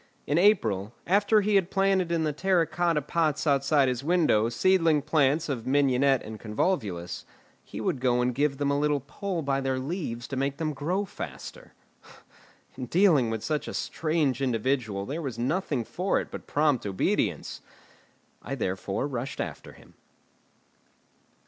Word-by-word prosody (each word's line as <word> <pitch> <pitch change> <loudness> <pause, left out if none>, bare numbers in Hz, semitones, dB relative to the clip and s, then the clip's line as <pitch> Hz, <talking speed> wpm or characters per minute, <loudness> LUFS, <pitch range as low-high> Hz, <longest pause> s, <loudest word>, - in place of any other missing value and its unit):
In 150 +4 +1
April, 115 - +2
after 205 +3 +3
he 210 +1 0
had 190 -3 +3
planted 195 -3 +1
in 165 -1 +1
the 155 -1 0
terra 180 +1 +2
cotta 170 -3 0
pots 155 +1 0
outside 140 -1 +3
his 125 0 -2
window 155 -10 +3
seedling 165 +3 +3
plants 150 0 +2
of 130 -5 -4
mignonette 135 -1 +3
and 110 0 -8
convolvulus, 105 - -2 0.4
he - - -8
would 135 - -1
go 125 -1 +2
and 125 0 +1
give 140 +2 0
them 140 0 0
a 140 - +1
little 150 -1 +1
pull 185 +2 -4
by 135 -1 0
their 135 -1 -1
leaves 130 -5 -4
to 135 - -4
make 135 +1 -1
them 155 -1 -2
grow 175 +9 -1
faster. - - -9 1.0
In 125 -1 -6
dealing 165 - +4
with 110 -1 -3
such 155 -1 -2
a - - -5
strange 155 -5 -1
individual 120 -5 -1
there 150 +8 -4
was 130 -7 -5
nothing 140 +1 -1
for 185 - 0
it - - -7
but - - -8
prompt 145 -4 +1
obedience. 95 -1 -1 0.8
I 135 - -5
therefore 95 0 -2
rushed 130 -1 -5
after - - -5
him. - - -19
140 Hz, 160 wpm, -27 LUFS, 125-165 Hz, 1.0 s, dealing